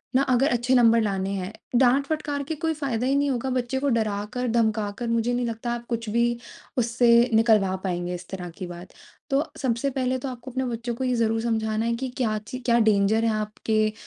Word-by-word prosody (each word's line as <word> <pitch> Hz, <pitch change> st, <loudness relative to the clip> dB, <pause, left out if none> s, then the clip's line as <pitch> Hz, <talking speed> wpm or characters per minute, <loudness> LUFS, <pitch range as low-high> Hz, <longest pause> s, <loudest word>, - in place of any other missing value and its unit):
ना 265 Hz, -, +5 dB
अगर 255 Hz, +3 st, +3 dB
अच्छे 240 Hz, +2 st, +2 dB
नंबर 230 Hz, -2 st, +5 dB
लाने 195 Hz, -3 st, -1 dB
हैं" 190 Hz, +1 st, -4 dB, 0.3 s
डाँट-फटकार 280 Hz, +3 st, +1 dB
के 315 Hz, +3 st, -4 dB
कोई 320 Hz, +2 st, -1 dB
फ़ायदा 265 Hz, -6 st, -2 dB
ही 275 Hz, -, +2 dB
नहीं 285 Hz, 0 st, +2 dB
होगा। 255 Hz, +1 st, -2 dB
बच्चे 255 Hz, 0 st, -1 dB
को 285 Hz, +1 st, 0 dB
डराकर-धमकाकर 220 Hz, 0 st, -1 dB
मुझे 230 Hz, +1 st, +1 dB
नहीं 245 Hz, 0 st, 0 dB
लगता 230 Hz, +1 st, -3 dB
आप 240 Hz, 0 st, -4 dB
कुछ 230 Hz, -2 st, -3 dB
भी 235 Hz, +2 st, +2 dB, 0.5 s
उससे 235 Hz, 0 st, +4 dB
निकलवा 220 Hz, -4 st, +4 dB
पाएँगे 175 Hz, -1 st, -2 dB
इस 175 Hz, 0 st, -9 dB
तरह 180 Hz, -2 st, -6 dB
की 185 Hz, -, -5 dB
बात। 175 Hz, +1 st, -10 dB, 0.4 s
तो 275 Hz, +2 st, +2 dB
सबसे 255 Hz, 0 st, 0 dB
पहले 260 Hz, -1 st, -1 dB
तो 270 Hz, -, -5 dB
आपको 250 Hz, +1 st, -8 dB
अपने 260 Hz, +1 st, -2 dB
बच्चों 235 Hz, 0 st, -3 dB
को 260 Hz, -, -4 dB
ये 255 Hz, -1 st, +1 dB
ज़रूर 225 Hz, -1 st, +1 dB
समझाना 220 Hz, -1 st, 0 dB
है 235 Hz, -, +1 dB
कि 260 Hz, +3 st, -3 dB
क्या 220 Hz, -5 st, 0 dB
ची 255 Hz, -, -5 dB
क्या 235 Hz, -1 st, +2 dB
डेंजर 215 Hz, 0 st, +3 dB
है 225 Hz, -, +2 dB
आपके 215 Hz, 0 st, 0 dB
235 Hz, 205 wpm, -25 LUFS, 215-255 Hz, 0.5 s, ना